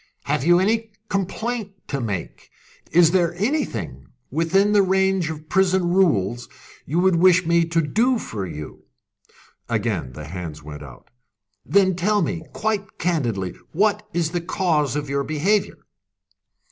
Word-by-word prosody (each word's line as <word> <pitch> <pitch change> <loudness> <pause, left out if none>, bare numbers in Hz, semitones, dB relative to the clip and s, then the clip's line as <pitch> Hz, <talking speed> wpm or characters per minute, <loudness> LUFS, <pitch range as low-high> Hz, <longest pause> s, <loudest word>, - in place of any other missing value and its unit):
"Have 145 -1 -1
you 175 +3 +5
any 220 +4 +1 0.2
complaint 205 +2 -2 0.2
to 140 -2 -2
make? 100 -7 -5 0.4
Is 165 -1 +5
there 175 -2 +2
anything, 180 - -2 0.2
within 170 +7 +2
the 205 -1 +5
range 190 -2 +2
of 160 - -4
the 150 - -15
prison 185 +1 +2
rules, 120 - +1 0.4
you 155 - -1
would 185 -2 +3
wish 180 0 +5
me 170 0 +3
to 165 0 +1
do 235 - +2
for 110 - -5
you?" 75 -2 -9 0.8
Again 105 - -1
the 75 +2 -8
hands 80 -2 -7
went 75 0 -9
out. 65 -4 -13 0.5
"Then 190 -2 +3
tell 205 +3 +1
me, 165 0 -2
quite 210 -2 -2
candidly, 120 - -1 0.2
what 210 +4 +1
is 170 -3 -1
the 175 - -1
cause 165 - 0
of 145 0 -2
your 140 0 -1
behaviour?" 165 +6 0
170 Hz, 145 wpm, -22 LUFS, 130-190 Hz, 0.8 s, you